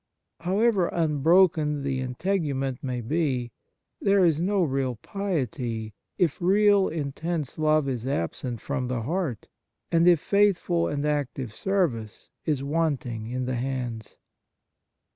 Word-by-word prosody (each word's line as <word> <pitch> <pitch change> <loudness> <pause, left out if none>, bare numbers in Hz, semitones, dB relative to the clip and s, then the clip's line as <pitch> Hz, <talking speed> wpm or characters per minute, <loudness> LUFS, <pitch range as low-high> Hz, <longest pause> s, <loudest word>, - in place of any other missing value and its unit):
However 195 +1 +2
unbroken 155 -1 +3
the 135 -1 -1
integument 135 -1 -2
may 125 -2 -2
be, 130 -2 -1 0.5
there 195 -2 +4
is 160 -2 +2
no 195 +1 +2
real 135 -4 -1
piety 120 - -3 0.2
if 170 -3 +1
real, 200 +2 +4
intense 160 0 -3
love 155 -2 +3
is 125 -2 -3
absent 120 +1 -3
from 140 -3 -2
the 125 -2 -2
heart, 155 - -2 0.4
and 170 +1 +4
if 175 -3 +6
faithful 190 -3 +2
and 145 0 -2
active 140 -5 -2
service 135 - -2
is 145 -4 0
wanting 140 -7 -1
in 125 +2 -3
the 130 - -2
hands. 125 -4 -4
145 Hz, 125 wpm, -26 LUFS, 125-175 Hz, 0.5 s, if